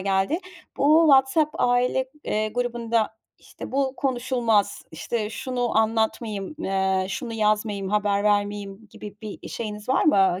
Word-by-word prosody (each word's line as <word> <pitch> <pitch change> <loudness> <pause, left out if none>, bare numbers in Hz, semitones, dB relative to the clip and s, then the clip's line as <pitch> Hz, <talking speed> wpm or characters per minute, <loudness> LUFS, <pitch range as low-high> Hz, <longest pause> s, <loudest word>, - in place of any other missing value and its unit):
geldi. 195 - +1 0.4
Bu 305 +4 +5
WhatsApp 275 +3 +4
aile, 250 +1 +2 0.2
eee, 215 0 0
grubunda, 235 -1 -1 0.2
işte, - - -11
bu 270 -1 0
konuşulmaz, 245 -5 0
işte, 210 +7 -3
şunu 245 -1 -1
anlatmayayım, 220 0 -1
eee, 190 - 0
şunu 235 +3 -4
yazmayayım, 210 -2 0
haber 205 -1 +1
vermeyeyim 205 0 -1
gibi 205 0 -10
bir 215 -2 -8
şeyiniz 210 -1 -6
var 260 - +2
mı, 190 - +4
220 Hz, 125 wpm, -24 LUFS, 205-245 Hz, 0.4 s, Bu